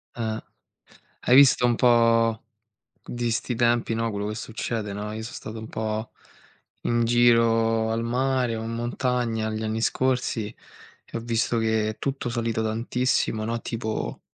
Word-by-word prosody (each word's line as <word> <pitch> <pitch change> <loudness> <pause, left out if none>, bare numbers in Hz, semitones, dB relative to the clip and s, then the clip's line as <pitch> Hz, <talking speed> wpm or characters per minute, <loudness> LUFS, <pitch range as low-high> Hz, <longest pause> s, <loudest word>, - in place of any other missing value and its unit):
Eh. 110 -2 -3 0.8
Hai 125 - +5
visto 135 -2 +7
un 120 -1 +3
po' 115 -2 +3 0.6
di 120 -1 -3
'sti 120 +2 -1
tempi, 120 -1 +2
no, 115 0 0
quello 100 0 -3
che 105 - -4
succede, 110 -1 -4
no, 105 +1 -5
io 110 +1 -5
so' 115 - -7
stato 110 +1 -7
un 110 - -7
po' 110 0 -3 0.7
in 120 0 +1
giro 115 -1 +3
al 115 +1 -1
mare 125 0 0
o 110 - -4
in 115 - -4
montagna 120 -1 -1
gli 110 0 -3
anni 110 +1 -2
scorsi 125 -3 0 0.6
e - - -7
ho - - -3
visto 115 0 0
che 110 -1 +1
è 110 - -6
tutto 135 -2 -2
salito 115 -1 -1
tantissimo, 115 0 0
no, 115 +2 -2
tipo 110 -2 -4
115 Hz, 160 wpm, -25 LUFS, 110-120 Hz, 0.8 s, visto